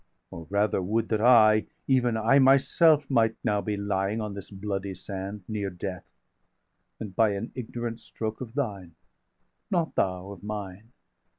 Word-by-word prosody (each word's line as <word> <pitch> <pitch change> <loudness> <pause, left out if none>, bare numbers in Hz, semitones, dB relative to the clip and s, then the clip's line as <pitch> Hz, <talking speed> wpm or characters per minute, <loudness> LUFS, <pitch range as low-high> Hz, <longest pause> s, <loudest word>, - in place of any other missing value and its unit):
815 - - -7
Or - - -8
rather 100 -1 +1
would 110 +5 -1
that 110 -2 0
I, 110 -3 +6 0.2
even 125 -4 +2
I 115 +6 +4
myself, 140 +3 +5
Might 115 -4 +2
now 105 -1 +1
be 105 -1 -3
lying 100 +1 -1
on 105 -2 -4
this 100 -2 -8
bloody 100 -1 -4
sand, 95 +2 -6
Near 105 -2 -2
death, 90 0 -7 0.9
and 100 -4 -7
by 110 -1 +3
an 100 +4 -5
ignorant 120 -1 -5
stroke 110 +1 -6
of 120 -1 -8
thine, 100 - -3 0.7
Not 170 -3 0
thou 95 +1 -1
of 95 -4 -10
mine! 105 +1 -7
105 Hz, 160 wpm, -27 LUFS, 100-115 Hz, 0.9 s, I